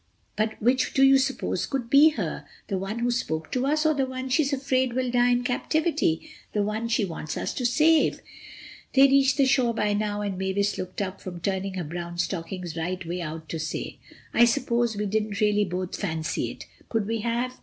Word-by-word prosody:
But 215 +1 -1
which 255 +3 +1
do 270 - +5
you 270 0 +7
suppose 270 0 -1
could 265 -4 -3
be 280 +5 +7
her—the 195 - -5
one 195 +4 -4
who 240 +1 0
spoke 160 -10 -2
to 255 +1 0
us 305 +2 +1
or 310 - +4
the 270 -2 0
one 260 0 -5
she's 280 +2 +2
afraid 260 -2 0
will 255 0 -1
die 245 0 +3
in 245 0 +2
captivity—the 250 - -1
one 215 +3 -2
she 230 -2 +1
wants 160 -3 -5
us - - -2
to 250 - 0
save." 315 +5 +3 0.8
They 270 - +6
had 275 0 +7
reached 275 0 +4
the 275 - +4
shore 255 -3 +2
by 210 -2 +1
now 205 0 -1
and 200 -2 -3
Mavis 200 +2 0
looked 185 +2 -3
up 190 0 -6
from 180 -2 -7
turning 190 +2 -2
her 180 - -2
brown 170 +2 -6
stockings 175 -1 -3
right 175 +2 -3
way 175 +1 -3
out 160 0 -6
to 165 - -3
say: 155 0 -4 0.3
"I 235 - +6
suppose 235 -1 +1
we 210 - -1
didn't 210 0 -1
really 210 -1 +3
both 185 0 -4
fancy 160 -5 -2
it. - - -9 0.2
Could 225 -3 0
we 225 +2 -2
have? 240 +3 -2
220 Hz, 205 wpm, -26 LUFS, 185-255 Hz, 0.8 s, you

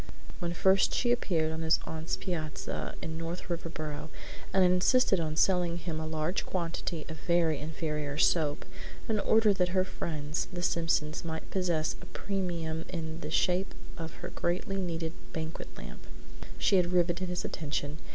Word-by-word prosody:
When 170 -2 -1
first 190 +2 +4
she 240 - +2
appeared 165 -10 +2
on 160 0 -3
his 160 0 +4
aunt's 160 +1 -2
piazza 160 -5 -3
in 160 0 -3
North 170 +2 -4
Riverboro 155 -3 -4 0.4
and 190 - +5
insisted 185 +3 +5
on 155 -2 -1
selling 175 0 +3
him 170 -2 -3
a 160 - -3
large 160 +3 0
quantity 170 -2 -2
of 160 - -6
very 170 -3 +2
inferior 150 -2 -2
soap 150 -2 +3 0.4
in 220 -2 +2
order 220 0 +5
that 180 0 +1
her 185 - +5
friends, 150 -5 -2
the 175 -1 -4
Simpsons, 165 -3 +1
might 160 -1 -5
possess 175 -5 +1
a - - -10
premium 170 -5 -2
in 160 -2 -4
the - - -5
shape 185 +2 +2 0.2
of 165 -1 -5
a - - -3
greatly 185 +3 -1
needed 165 -3 -2 0.2
banquet 160 0 -4
lamp, - - -9 0.5
she 135 - +4
had 175 -1 +3
riveted 175 +1 +2
his 180 0 -2
attention. 145 0 -2
165 Hz, 160 wpm, -31 LUFS, 160-180 Hz, 0.5 s, and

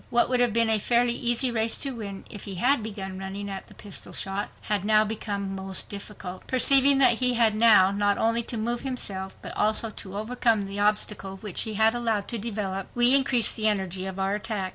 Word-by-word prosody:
What 240 +1 +1
would 250 -1 0
have 245 -1 +2
been 230 0 +3
a 220 - +5
fairly 240 +2 +1
easy 240 +1 +1
race 225 -1 +1
to 275 - -2
win, 200 -4 -8
if 205 - -10
he 195 - -5
had 250 +7 +2
begun 195 -3 -7
running 195 +1 -7
at 195 - -8
the - - -17
pistol 205 -2 -9
shot, 195 +1 -3
had 205 -3 -1
now 215 +1 +3
become 205 -2 -5
most 190 0 -1
difficult. 200 -2 -8
Perceiving 270 +2 +6
that 255 -4 +4
he 250 -1 +2
had 230 -2 +4
now 215 -4 +5
not 205 0 0
only 230 +1 +2
to 235 - -5
move 235 +2 -2
himself, 195 -8 -5
but - - -8
also 215 +1 +1
to 195 -1 -7
overcome 225 -1 -1
the 195 +1 -6
obstacle 205 -2 -1
which 200 -2 -1
he 215 - -5
had 220 +2 +3
allowed 225 -4 -2
to 235 - -4
develop, 200 -3 -5
we 240 +1 +6
increased 265 -4 +2
the 220 -1 +1
energy 190 -2 -1
of 190 0 -7
our 195 +1 -2
attack. 210 -3 -4
215 Hz, 215 wpm, -25 LUFS, 195-235 Hz, -, Perceiving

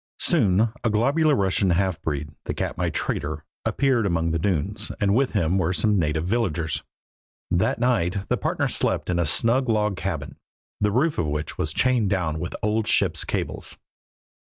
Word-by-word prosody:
Soon 110 - +3
a 115 - +2
globular 140 +8 +3
Russian 95 -2 +1
half 90 0 +1
breed, 75 -1 -3
the - - -3
Katmai - - -2
trader, 75 +1 -3 0.2
appeared 130 -6 +2
among 85 -2 0
the 80 - 0
dunes, 100 +4 -1
and 100 -2 +2
with 135 +4 +2
him 90 -2 +1
were 90 0 +1
some 105 +1 +2
native 80 0 0
villagers. 90 -7 -1 0.7
That 85 - +2
night 100 -6 0
the - - +1
partners - - -1
slept - - 0
in 85 - 0
a 85 - +1
snug 115 - +2
log 105 -2 +1
cabin, 80 -4 -4 0.4
the 105 - +2
roof 140 +9 +1
of 80 - 0
which 75 +1 -4
was 75 - 0
chained 120 +2 +2
down 85 -5 -1
with 85 - -4
old 105 0 +1
ships' - - +2
cables. - - -4
95 Hz, 170 wpm, -24 LUFS, 80-115 Hz, 0.7 s, Soon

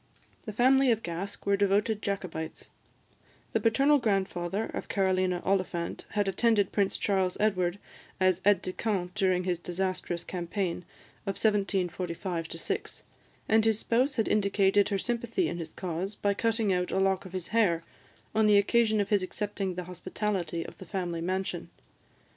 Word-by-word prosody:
The 215 - -4
family 260 +4 +4
of 225 -1 0
Gask 185 +4 -5
were 200 - +3
devoted 205 +2 +2
Jacobites; 180 -5 -4 0.8
the - - +3
paternal 275 +6 +4
grandfather 195 -2 0
of - - -5
Carolina 185 -2 +1
Oliphant 185 -3 -1
had 205 -1 0
attended 205 0 +2
Prince 200 -2 +1
Charles 190 -3 +1
Edward 185 -4 +1 0.4
as 185 -1 +3
aid 200 -2 +4
de 185 - -3
camp 185 -5 -2
during 185 -3 +2
his 180 -2 -1
disastrous 180 -1 -2
campaign 180 0 -3 0.4
of 195 - -1
1745 185 -4 -1
6, 395 - -4 0.4
and 220 0 +4
his 220 -1 +3
spouse 255 +5 +1
had 225 -3 +1
indicated 200 -1 +3
her 200 - +1
sympathy 240 - -1
in 175 - -4
his 165 -1 -5
cause 185 +4 -4
by 200 0 +1
cutting 225 -1 +1
out 180 0 0
a - - 0
lock 190 0 +1
of 185 - -10
his 185 -3 -4
hair 190 -7 +2 0.5
on 220 0 +4
the 210 -1 +6
occasion 220 +1 +3
of 200 -1 0
his 205 -2 +3
accepting 195 0 -3
the 180 - -4
hospitality 180 -1 -3
of - - -11
the 185 - -9
family 175 -2 -3
mansion. 185 +2 -2
195 Hz, 160 wpm, -29 LUFS, 180-215 Hz, 0.8 s, the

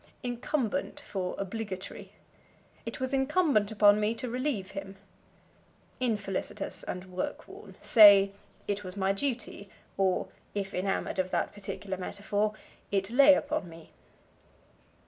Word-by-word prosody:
Incumbent 250 +3 -2
for 190 -10 -4
Obligatory. 195 -1 -5 0.8
"It 230 - -5
was 260 +1 -2
incumbent 270 - +2
upon 210 -1 +5
me 215 +2 +1
to 240 +1 -4
relieve 250 -6 -2
him." 195 0 -7 1.0
Infelicitous 210 -6 -3
and 180 +1 -6
work 235 +11 -4
worn. - - -12
Say, 200 -3 +8 0.4
It 205 0 -2
was 185 +1 -7
my 195 0 +2
duty, 230 -3 -3 0.3
or, 190 -1 +2 0.3
if 195 -1 -3
enamored 195 +1 -1
of 185 0 0
that - - -1
particular 195 -1 -5
metaphor, 205 +3 -2 0.4
It 195 +1 0
lay 280 +3 +8
upon 290 - -2
me. 165 -1 -13
205 Hz, 125 wpm, -29 LUFS, 195-250 Hz, 1.0 s, Say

